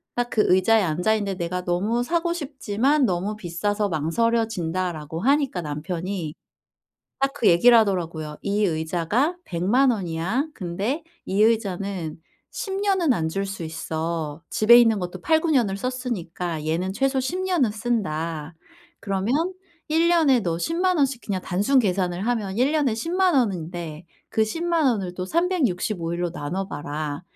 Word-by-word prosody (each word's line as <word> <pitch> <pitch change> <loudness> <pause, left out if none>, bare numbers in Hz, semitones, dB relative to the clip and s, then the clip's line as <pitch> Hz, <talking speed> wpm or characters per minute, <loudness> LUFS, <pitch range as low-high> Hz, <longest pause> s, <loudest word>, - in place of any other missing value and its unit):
딱 245 0 -1
그 215 - +3
의자에 190 +5 +4
앉아 180 +5 +1
있는데 200 -3 -2
"내가 180 +1 -3
너무 205 +7 0
사고 340 +5 0
싶지만 275 -3 0
너무 190 +1 -1
비싸서 205 +3 -1
망설여진다."라고 175 -3 -1
하니까 275 -5 +2
남편이 165 +2 -4 0.9
딱 275 0 +2
그 285 -6 -1
얘기를 235 +8 +6
하더라고요. 165 -7 -1
"이 205 +1 +1
의자가 175 - 0
1,000,000 205 +10 +2
원이야. 190 - -2
근데 200 - -3 0.2
이 195 +2 0
의자는 195 -7 0 0.3
10 - - -4
년은 380 -7 +2
앉을 195 0 -1
수 195 -2 -6
있어. 160 -1 -4
집에 225 +2 +6
있는 225 -3 +4
것도 180 0 -5
8-9 320 - +2
년을 225 -9 +2
썼으니까 180 - -4
얘는 175 +4 -1
최소 270 +3 +1
10 295 +8 -2
년은 350 - +2
쓴다. 165 -9 -2 0.5
그러면 195 +3 -1 0.5
1 325 +2 +3
년에 310 -8 +4
너 170 -5 -2
100,000 355 - +1
원씩 270 -4 +1
그냥 195 -3 -2
단순 205 +9 +2
계산을 185 -3 0
하면 215 -5 -1
1 265 +4 +3
년에 290 -7 +2
100,000 355 +7 +1
원인데 175 - -2 0.3
그 220 - +2
100,000 330 +7 0
원을 195 -8 0
또 185 - -4
365 220 - 0
일로 175 0 -2
나눠봐라. 150 -2 -4
200 Hz, 260 characters per minute, -24 LUFS, 175-255 Hz, 0.9 s, 얘기를